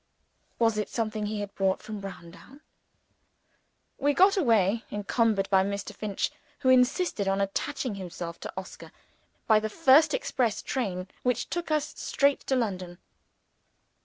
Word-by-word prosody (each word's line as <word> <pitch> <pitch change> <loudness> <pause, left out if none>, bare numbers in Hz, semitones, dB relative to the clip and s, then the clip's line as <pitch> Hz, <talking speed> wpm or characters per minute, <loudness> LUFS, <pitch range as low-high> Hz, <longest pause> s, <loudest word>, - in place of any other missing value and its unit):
Was 225 -2 +2
it 210 - -2
something 215 -2 -2
he 210 0 -3
had 200 -1 -6
brought 190 -1 0
from 215 -1 -6
Browndown? 195 - -11 1.4
We 285 0 +2
got 385 +2 +6
away 225 - +2
encumbered 205 -1 +1
by 190 -1 +5
Mr. 200 +1 -4
Finch, 205 -1 -2 0.3
who 260 - +2
insisted 255 - +3
on 195 0 +1
attaching 230 +5 -2
himself 175 -3 -7
to - - -7
Oscar - - -8 0.5
by 220 -1 +5
the 215 0 -3
first 310 - +5
express 245 - -1
train, 190 -8 -3
which 250 -2 -1
took 345 -1 -3
us 305 -1 0
straight 280 0 +2
to 265 - +2
London. 185 -7 -2
215 Hz, 140 wpm, -28 LUFS, 195-260 Hz, 1.4 s, got